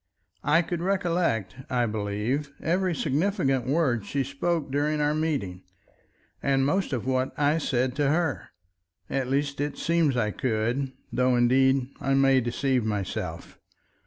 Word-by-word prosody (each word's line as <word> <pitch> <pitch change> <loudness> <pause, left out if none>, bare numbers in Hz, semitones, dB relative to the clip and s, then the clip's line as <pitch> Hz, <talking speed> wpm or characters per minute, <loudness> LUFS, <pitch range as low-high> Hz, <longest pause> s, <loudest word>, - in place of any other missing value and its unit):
I 160 +4 +4
could 170 0 -3
recollect, 170 - 0
I 125 -1 +1
believe, 110 +6 -2
every 180 +1 0
significant 145 - 0
word 135 -6 +1
she 135 +7 -1
spoke 140 +3 -2
during 150 +2 0
our 150 0 +2
meeting, 140 - -2 0.8
and 135 -1 +2
most 190 +6 0
of 125 -4 -2
what 130 0 0
I 150 +2 +2
said 130 -3 0
to 145 -2 +2
her. 160 -2 0 0.6
At 135 -2 -1
least, 140 +1 0
it 145 0 -2
seems 165 -6 +1
I 105 -3 +1
could, 125 +3 -1 0.2
though 125 0 +3
indeed 130 +2 +3
I 135 0 +1
may 135 -1 +4
deceive 125 +1 0
myself. 105 -3 -4
135 Hz, 140 wpm, -26 LUFS, 125-155 Hz, 0.8 s, I